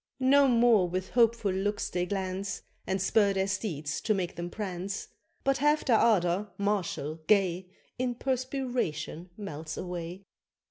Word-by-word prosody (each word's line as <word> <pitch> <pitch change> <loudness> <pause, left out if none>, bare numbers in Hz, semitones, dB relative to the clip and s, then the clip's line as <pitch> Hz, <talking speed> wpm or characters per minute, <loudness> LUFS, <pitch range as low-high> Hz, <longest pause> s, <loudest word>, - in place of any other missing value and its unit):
No 275 +2 +5
more 235 -7 +4
with 185 +1 -3
hopeful 230 -4 +3
looks 205 +2 -1
they 180 0 -1
glance, 195 0 -3 0.2
And 190 +1 0
spur 200 +2 +3
their 190 0 +1
steeds 170 -7 -3
to 215 - +1
make 180 -2 -2
them 175 +1 -4
prance; 195 -1 -4 0.3
But 275 0 +2
half 295 +2 +3
their 235 -5 +4
ardour, 200 -2 +2
martial, 185 -6 -1
gay, 185 -3 +2 0.3
In 250 -1 0
perspiration 250 - -2
melts 155 -6 -6
away. 180 +1 -5
195 Hz, 140 wpm, -29 LUFS, 180-230 Hz, 0.3 s, No